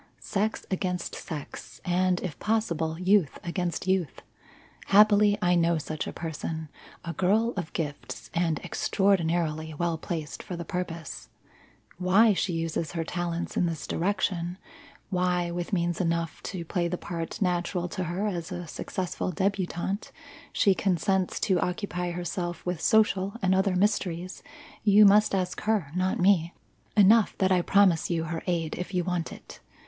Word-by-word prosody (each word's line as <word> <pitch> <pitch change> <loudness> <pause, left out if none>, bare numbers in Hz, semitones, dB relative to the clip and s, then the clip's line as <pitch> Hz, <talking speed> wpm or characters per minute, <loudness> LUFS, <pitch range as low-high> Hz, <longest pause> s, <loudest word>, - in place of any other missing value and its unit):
Sex 215 +2 -2
against 180 -2 -2
sex, 150 -4 -7
and, 180 0 +2
if 165 -7 -5
possible, 170 -8 0
youth 185 -4 +3
against 175 0 -2
youth. 185 -6 0 0.6
Happily, 205 0 +6
I 180 0 +4
know 170 -1 +3
such 155 0 -4
a - - -3
person 160 -1 -5 0.4
a 170 - -3
girl 215 +7 +2
of 175 -5 -4
gifts 140 -8 -5
and 165 -2 +1
extraordinarily 165 -5 +1
well 170 0 -1
placed 160 -3 -5
for 180 - -6
the 170 0 -6
purpose. 170 -2 -5 0.7
Why 200 +5 +5
she 185 -1 -1
uses 165 -1 -2
her 165 -1 -1
talents 175 0 -3
in 175 - +2
this 165 -3 -4
direction 180 -1 -1 0.5
why, 180 -1 +1
with 175 +2 -4
means 175 -2 0
enough 170 -2 -1
to 175 -3 -5
play 175 +1 0
the 180 +1 -2
part 165 -2 -5
natural 175 -1 0
to 180 +1 -3
her 175 +5 -2
as 175 -5 -3
a 175 -1 -4
successful 185 +3 -3
debutante, 190 +1 -2 0.4
she 200 - +4
consents 190 0 0
to 185 -3 +2
occupy 180 0 -2
herself 175 0 -4
with 180 -2 -2
social 200 -2 +3
and 185 0 +4
other 190 0 +2
mysteries, 185 -2 0 0.4
you 210 0 +7
must 205 0 +5
ask 185 -1 -2
her, 210 -9 0
not 185 +1 +1
me. 180 -3 +3 0.4
Enough 210 +2 +6
that 190 -1 +2
I 180 -1 +4
promise 190 -3 +3
you 165 -2 0
her 165 0 -4
aid 165 -3 -1
if 180 +1 -5
you 180 - +2
want 180 -2 -2
it. - - -11
180 Hz, 155 wpm, -27 LUFS, 170-190 Hz, 0.7 s, you